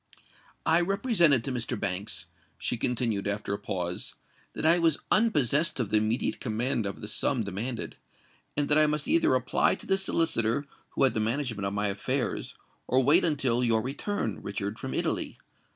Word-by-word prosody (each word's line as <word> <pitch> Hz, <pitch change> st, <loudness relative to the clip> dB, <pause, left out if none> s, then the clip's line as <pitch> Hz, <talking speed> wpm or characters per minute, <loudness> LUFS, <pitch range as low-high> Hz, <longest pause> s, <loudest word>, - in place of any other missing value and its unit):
"I 165 Hz, +2 st, +4 dB
represented 175 Hz, -, +3 dB
to 135 Hz, -, -3 dB
Mr. 120 Hz, -2 st, -2 dB
Banks," 95 Hz, -2 st, -2 dB, 0.3 s
she -, -, -2 dB
continued, 115 Hz, -4 st, 0 dB
after 100 Hz, 0 st, -2 dB
a 100 Hz, -, -3 dB
pause, 90 Hz, -3 st, -4 dB, 0.4 s
"that -, -, -4 dB
I 165 Hz, +2 st, +5 dB
was 165 Hz, -3 st, +3 dB
unpossessed 155 Hz, -, +3 dB
of 115 Hz, -5 st, -1 dB
the 110 Hz, -, +4 dB
immediate 110 Hz, +3 st, 0 dB
command 115 Hz, -1 st, -1 dB
of 100 Hz, -, -6 dB
the 105 Hz, -, -6 dB
sum 115 Hz, +3 st, +1 dB
demanded, 110 Hz, +5 st, -4 dB, 0.6 s
and 145 Hz, -1 st, +2 dB
that 150 Hz, 0 st, +4 dB
I 155 Hz, -, +5 dB
must 150 Hz, +6 st, -1 dB
either 330 Hz, +3 st, +3 dB
apply -, -, +2 dB
to -, -, -10 dB
the 195 Hz, -, +2 dB
solicitor 145 Hz, -, +1 dB, 0.3 s
who -, -, +2 dB
had 130 Hz, -4 st, +4 dB
the 110 Hz, -, -1 dB
management 115 Hz, -3 st, -1 dB
of 100 Hz, -, -3 dB
my 105 Hz, +1 st, 0 dB
affairs, 100 Hz, 0 st, -2 dB, 0.3 s
or 130 Hz, +1 st, +3 dB
wait 150 Hz, +8 st, +5 dB
until 135 Hz, -6 st, +1 dB
your 115 Hz, -2 st, +2 dB
return, 135 Hz, -, -3 dB
Richard, 100 Hz, +2 st, -4 dB
from -, -, -5 dB
Italy. -, -, -2 dB
120 Hz, 175 wpm, -28 LUFS, 105-150 Hz, 0.6 s, I